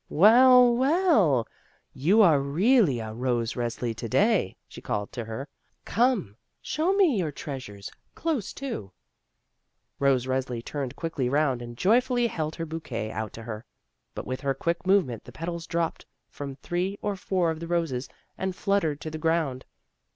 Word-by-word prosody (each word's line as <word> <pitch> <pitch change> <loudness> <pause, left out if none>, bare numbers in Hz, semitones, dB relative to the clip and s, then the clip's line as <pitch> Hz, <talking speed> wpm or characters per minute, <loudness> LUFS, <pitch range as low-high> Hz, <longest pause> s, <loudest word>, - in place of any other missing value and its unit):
"WeU, 245 - +7
well, 260 - +3 0.5
you 190 +11 +4
are 160 -7 +5
really 165 - +3
a 110 -1 -5
Rose 120 -1 -1
Resli 120 -1 -3
to 115 - -5
day," 205 - +2
she - - -11
called 105 0 -3
to 120 -3 -5
her; 115 +6 -6 0.4
"come, 230 - +1 0.2
show 320 +5 0
me 370 - +4
your 160 -4 -1
treasures 130 -9 -7 0.2
close 305 - -2
to." 235 - -5 1.1
Rose 135 -3 +3
Resli 130 -2 -2
turned 140 -4 -4
quickly 160 -7 -2
round, 140 -3 +1
and 120 0 -8
jojrfully 245 - +3
held 155 -5 -3
her 165 - -4
bouquet 145 -9 -5
out 110 -1 -4
to 115 - -9
her. 110 -1 -6 0.5
But - - -5
with 130 0 -4
her 135 -1 0
quick 170 +6 -2
movement 175 - +2
the - - -11
petals 170 0 -5
dropped 165 -1 -2 0.2
from 140 -2 -6
three 180 +7 -2
or 205 -1 -1
four 180 -2 0
of 160 - -5
the 170 - -6
roses 165 -7 -1 0.3
and 190 -1 -2
fluttered 170 -8 0
to 155 - -5
the 155 - -5
groimd. 160 -5 0
155 Hz, 160 wpm, -27 LUFS, 125-200 Hz, 1.1 s, WeU